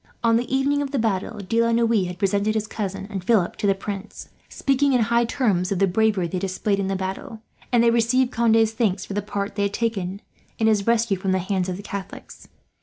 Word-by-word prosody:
On 230 -1 +4
the 240 +2 -1
evening 275 +2 +1
of 285 - -2
the 275 - -2
battle 220 -1 -1
De 230 +2 +2
la 230 0 +2
Noue 230 -4 +2
had 180 0 -7
presented 205 +2 +1
his 215 -1 0
cousin 195 -2 -4
and 190 -3 -4
Philip 195 -4 +2
to 205 - -1
the 195 - +3
Prince, 200 +1 -7 0.2
speaking 275 0 +1
in 250 - +3
high 235 +2 +2
terms 200 -7 0
of 195 - 0
the 195 - +4
bravery 195 -1 +1
they 180 +2 -3
displayed 195 +2 -1
in 195 - -1
the 195 - -1
battle, 190 +4 -5 0.3
and 240 -2 +4
they - - +4
had - - +2
received 245 +2 +2
Conde's 225 -2 +3
thanks 210 -4 0
for - - -7
the 205 - -1
part 200 0 -4
they 205 - -3
had 200 0 0
taken 200 -4 -2 0.3
in 220 - +1
his 215 -2 +2
rescue 230 -3 +2
from 190 0 -1
the - - +2
hands 185 0 -1
of 180 - -3
the 200 - -9
Catholics. 200 -2 -8
210 Hz, 240 wpm, -23 LUFS, 195-230 Hz, 0.3 s, On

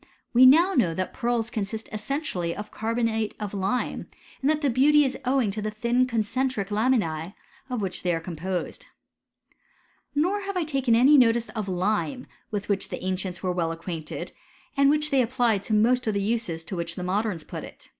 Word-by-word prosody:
We 255 +2 +8
now 335 +8 +6
know 180 - +2
that 185 +1 -3
pearls 235 -2 -1
consist 220 0 -4
essentially 210 - -3
of 210 0 -7
carbonate 225 -1 -1
of 210 -2 -5
lime, 200 +5 -2 0.3
and 275 - +2
that 305 0 +1
the 285 - +2
beauty 290 +4 +5
is 265 - -1
owing 255 -5 +2
to 210 +2 -3
the 215 - -2
thin 235 +4 +1
concentric 230 -2 -1
lamin«B, 205 -7 0 0.4
of 240 -5 -2
which 185 -2 -2
they 175 -2 +1
are - - -2
composed. 175 +2 -4 1.3
Nor 360 +8 +2
have 395 -1 -4
I 355 - +1
taken 270 -6 +1
any 270 +5 +6
notice 235 -1 +3
of 215 -4 -4
lime 210 +8 -1 0.2
with 205 -2 -4
which 200 -1 0
the - - -6
ancients 185 0 -3
were 185 - +1
well 170 -2 -1
acquainted, 165 -1 -6 0.4
and 280 0 +5
which 300 +1 +2
they 270 -2 +4
applied 240 -4 +1
to 220 - -1
most 240 +3 +3
of 215 - +1
the 200 - 0
uses 205 -7 -1
to 190 - -6
which 170 -1 -2
the 180 - -5
modems 190 -2 -1
put - - -6
it. - - -13
220 Hz, 190 wpm, -26 LUFS, 190-255 Hz, 1.3 s, We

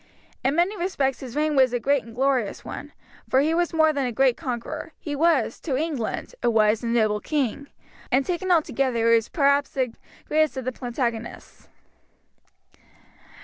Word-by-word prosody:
In 270 +3 +1
many 350 +5 +2
respects 315 -9 -1
his 250 -3 -8
reign 305 0 +1
was 260 -2 +4
a 245 - +1
great 280 +2 +1
and 230 0 -13
glorious 260 -4 0
one, - - -7 0.4
for 260 - +4
he 310 +3 +1
was 345 0 +1
more 315 -1 +3
than 280 -3 -1
a - - -2
great 260 0 +3
conqueror, 300 +3 -5
he 295 -2 -4
was, 330 +3 +2
to 270 -6 -2
England, 295 - -3
a - - +2
wise 215 -1 +3
and 230 - -1
noble 215 -3 +2
king; 280 +1 -2 0.4
and 265 +2 +3
taken 365 +1 -2
altogether 265 -8 +2
he - - +7
was 225 - -3
perhaps 280 -2 +2
the 255 -4 -2 0.3
greatest 310 -2 +1
of 260 - -4
the 255 - -1
Plantagenets. 240 -2 -5
270 Hz, 175 wpm, -24 LUFS, 240-310 Hz, 0.4 s, he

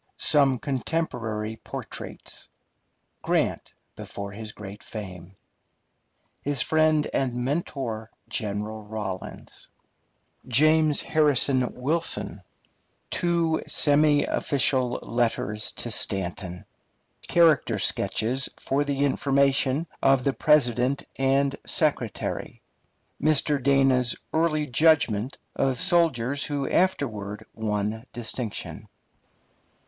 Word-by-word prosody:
SOME 140 -4 +3
CONTEMPORARY 120 -6 -3
PORTRAITS. - - -7 0.7
Grant - - -1 0.2
before 100 0 -7
his 110 +1 -7
great 105 -1 -10
fame 95 -4 -9 1.1
His 145 -2 +1
friend 155 -1 +2
and 130 -3 0
mentor, 125 -4 -3 0.2
General 105 +1 -3
Rawlins 105 -3 -7 0.8
James 155 +4 +4
Harrison 140 -4 +3
Wilson 155 +7 -2 0.7
Two 170 -2 +1
semi 145 0 +4
official 130 -3 +1
letters 115 -3 0
to 120 - -3
Stanton 95 -2 -2 0.6
Character 165 -4 +4
sketches 125 +4 0
for 140 +2 0
the 140 -1 0
information 140 +1 +1 0.2
of 135 -1 +4
the 140 - +1
President 130 -3 +2
and 135 +1 +2
Secretary 145 - -1 0.6
Mr. 150 -1 +3
Dana's 135 -2 +3 0.2
early 155 -2 +1
judgment 130 -5 +2 0.2
of 130 -3 0
soldiers 145 -7 +1
who 145 -2 -2
afterward 110 - -1
won 105 0 -2
distinction. 120 -1 -4
130 Hz, 85 wpm, -25 LUFS, 110-145 Hz, 1.1 s, James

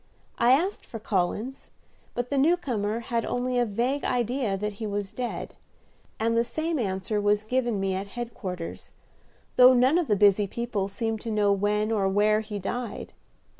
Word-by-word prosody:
I 240 +2 +6
asked 360 +9 +1
for 230 - -8
Collins, 215 +5 -2 0.5
but 245 +2 -3
the 280 - +1
new 330 +6 +4
comer 225 -7 -2
had 230 0 -1
only 245 0 -1
a 240 - +2
vague 245 +7 -1
idea 245 -4 0
that 210 +1 -3
he 220 - -2
was 205 -1 -3
dead; 245 -1 -4 0.7
and 230 +1 +1
the 230 - +4
same 315 +5 -2
answer 200 0 -1
was 205 +1 +2
given 240 -2 0
me 195 0 0
at 190 +2 -3
headquarters, 195 -8 -6 0.6
though 255 0 +8
none 260 +7 +4
of 340 - -1
the 210 - +3
busy 205 0 +4
people 220 -2 -2
seemed 225 +1 -3
to 230 - -5
know 210 -2 +2
when 210 +2 0
or 200 -3 +2
where 210 +2 +3
he 215 -1 -5
died. 230 +4 -5
225 Hz, 175 wpm, -26 LUFS, 205-245 Hz, 0.7 s, though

